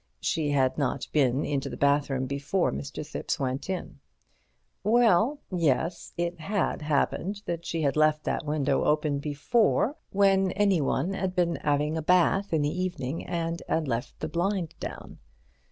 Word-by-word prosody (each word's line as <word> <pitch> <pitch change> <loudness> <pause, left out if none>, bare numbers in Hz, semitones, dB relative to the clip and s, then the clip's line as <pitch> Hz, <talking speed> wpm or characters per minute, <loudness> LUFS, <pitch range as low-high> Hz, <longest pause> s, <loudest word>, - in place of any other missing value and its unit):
She 155 -2 0
had 135 -1 +1
not 140 -1 -1
been 135 -2 +2
into 140 -1 -2
the - - -7
bathroom 140 -2 +2
before 140 +7 0
Mr. 70 +1 -5
Thipps - - -3
went 130 +5 -2
in. 180 -6 -4 0.8
Well, 230 +3 +4
yes, 170 0 0
it 175 0 -2
had 195 +3 -1
happened 165 +7 -1
that 170 0 -4
she 165 -1 -2
had 140 -2 +1
left 155 0 +3
that - - -1
window 145 -2 0
open 150 -1 +1
before, 210 - +1
when 195 -1 +3
anyone 190 -2 +1
had 190 -1 -2
been 170 -2 +1
'aving 150 +1 +1
a - - -1
bath 180 +4 +3
in 160 -3 +2
the 150 +5 -1
evening 165 -5 -3
and 170 0 -2
'ad 160 -2 0
left 120 -1 -3
the 155 - -1
blind 175 +1 -1
down. - - -7
160 Hz, 155 wpm, -27 LUFS, 145-185 Hz, 0.8 s, Well